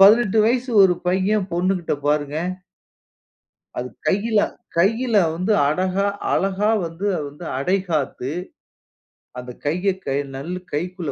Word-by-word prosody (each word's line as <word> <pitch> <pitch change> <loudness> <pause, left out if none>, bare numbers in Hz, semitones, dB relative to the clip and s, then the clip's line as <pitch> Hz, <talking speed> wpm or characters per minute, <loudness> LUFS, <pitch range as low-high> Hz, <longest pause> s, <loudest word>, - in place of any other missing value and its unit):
18 215 +2 +6
வயசு 245 +3 +1
ஒரு 185 -2 +5
பையன் 190 +2 +1
பொண்ணுகிட்ட 180 -1 0
பாருங்க 145 0 +1 1.4
அது - - -3 0.2
கையில 215 +3 +2 0.4
கையில 225 +7 +2 0.2
வந்து 185 +6 0 0.2
அடகா 185 +5 +1 0.3
அழகா 195 +3 +1 0.2
வந்து 165 -3 -3
அடைகாத்து 155 -5 -1 1.1
அந்த 125 0 -7
கையை 180 +6 +1
க 135 - -1 0.2
நல்ல 155 +7 -4 0.2
கைக்குள்ள 175 0 -3
185 Hz, 105 wpm, -22 LUFS, 160-200 Hz, 1.4 s, 18